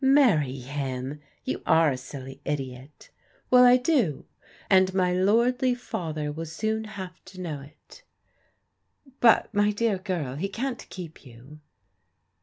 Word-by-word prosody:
" - - -10
Marry 220 - +4
him 135 +1 -4
I - - -32 0.2
You 130 - -3
are 160 -2 +5
a - - -1
silly 135 +1 -9
idiot." 135 -1 -6
^ - - -46 0.2
" - - -36
Well, 250 0 +8
I 250 0 +7
do, 250 - +1 0.4
and 190 -1 +5
my 180 -1 +2
lordly 240 +7 +2
father 155 -10 -4
will 165 +2 -6
soon 220 +7 -2
have 200 -4 -7
fx\ 190 0 -14
know 160 -6 -5
it" 150 - -16 0.6
" 270 -2 -30
But, 230 -1 +5
my 205 0 +3
dear 210 -2 0
girl, 170 -9 -3
he 195 +6 -2
can't 255 +4 -4
keep 170 -4 -9
you." 130 +4 -14
180 Hz, 160 wpm, -26 LUFS, 145-220 Hz, 0.6 s, Well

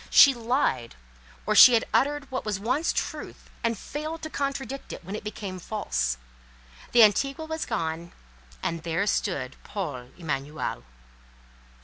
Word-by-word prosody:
She 275 - +8
lied, 235 - 0 0.5
or - - +2
she 250 - +10
had 225 - +2
uttered 290 +1 +2
what 260 - -2
was 210 -3 -2
once 255 +10 +1
truth, - - -5
and 230 -1 +1
failed 310 +8 -5
to 315 - -5
contradict 275 -1 -3
it - - -8
when 195 +3 -5
it 215 - -6
became 200 -3 -5
false. 60 - -1 0.7
The 240 -1 +8
Antigua 275 +8 +3
was 320 0 -4
gone, 170 -5 -3 0.5
and 165 -1 -2
there 170 +4 0
stood 140 -10 -1
Paul 145 -12 -5
Emanuel. 150 - -3
210 Hz, 140 wpm, -27 LUFS, 165-275 Hz, 0.7 s, she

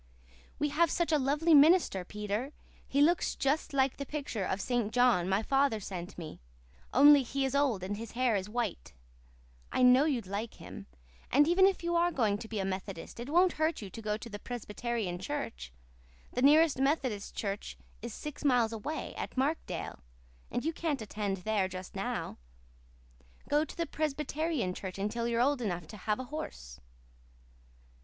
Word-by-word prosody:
"We 295 - 0
have 325 +3 +3
such 340 +1 0
a 305 - +4
lovely 295 +5 +2
minister, 300 - +6
Peter. 210 +8 -4 0.3
He 280 - +1
looks 335 +2 +2
just 295 +3 0
like 270 -2 +1
the 280 - -3
picture 280 -9 -3
of 190 +1 -1
St. 240 -1 -1
John 240 -8 +3
my 195 +3 +1
father 270 -3 +2
sent 185 -1 -7
me, 160 - -8 0.5
only 285 +2 +8
he 270 +2 -1
is 265 - -2
old 275 -9 +1
and 200 +2 -3
his 225 0 -8
hair 245 -2 +2
is 195 0 -2
white. 225 - -3 0.8
I 255 - +2
know 250 +3 +7
you'd 260 -9 0
like 205 +4 -4
him. - - -10 0.4
And 290 +3 +5
even 375 +3 +6
if 385 -3 -1
you 345 0 0
are 345 +1 +3
going 215 -9 +1
to 220 - -8
be 220 - -5
a 190 - -1
Methodist 190 0 -5
it 240 +3 -6
won't 355 +4 +4
hurt 315 -7 +1
you 195 - -8
to 225 - -8
go 210 -1 -1
to 225 - -9
the 205 -2 -7
Presbyterian 230 -5 -4
church. 65 - -5 0.6
The 250 - -1
nearest 300 +1 +5
Methodist 265 -7 0
church 200 -1 -4 0.2
is 235 +1 -5
six 300 +7 -7
miles 245 -5 +3
away, 285 +9 -4
at - - -5
Markdale, 285 - -2 0.5
and 245 - -3
you 325 - 0
can't 300 -7 -2
attend 205 -2 -3
there 200 +1 0
just 185 0 -8
now. - - -3 1.1
Go 295 +1 +3
to - - -9
the 335 - 0
Presbyterian 300 - -2
church 185 0 -6
until 220 +4 -2
you're 235 -1 0
old 275 0 +2
enough 175 -6 -2
to 210 - -9
have 210 +3 -1
a - - -3
horse." 60 - -7
245 Hz, 180 wpm, -31 LUFS, 205-290 Hz, 1.1 s, only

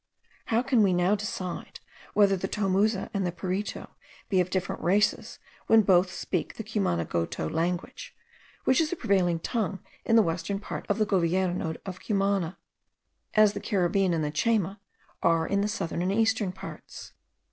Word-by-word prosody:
How 230 +2 +1
can 255 -3 +3
we 195 -3 +4
now 180 +3 +3
decide, 195 -3 -4 0.4
whether 200 -2 +5
the 190 +1 -3
Tomuza 200 +1 0
and 200 - 0
Piritu 185 +4 -3 0.4
be 190 -3 +3
of 180 - -2
different 185 -1 -2
races, 200 +5 +1 0.3
when 225 -1 +6
both 185 -2 +4
speak 180 -1 -3
the 220 - -5
Cumanagoto 85 - -1
language, 180 - -3 0.5
which 260 +4 +3
is 315 - 0
the 355 - -2
prevailing 190 - +1
tongue 205 +1 -2 0.3
in 225 - +2
the 225 - +7
western 170 +3 -2
part 205 - -6
of 205 - +1
the 215 - +2
Govierno 180 -3 0
of 190 -1 -6
Cumana; 195 -4 0 0.8
as 215 -1 +6
the 205 - -4
Caribbean 195 -2 +1
and 165 -2 0
the 150 - -1
Chayma 200 +3 0 0.4
are 165 -1 +3
in 200 +3 0
the 205 - +1
southern 195 -6 -3
and 185 +2 0
eastern 220 -2 +1
parts. 190 - -10
195 Hz, 160 wpm, -27 LUFS, 175-210 Hz, 0.8 s, the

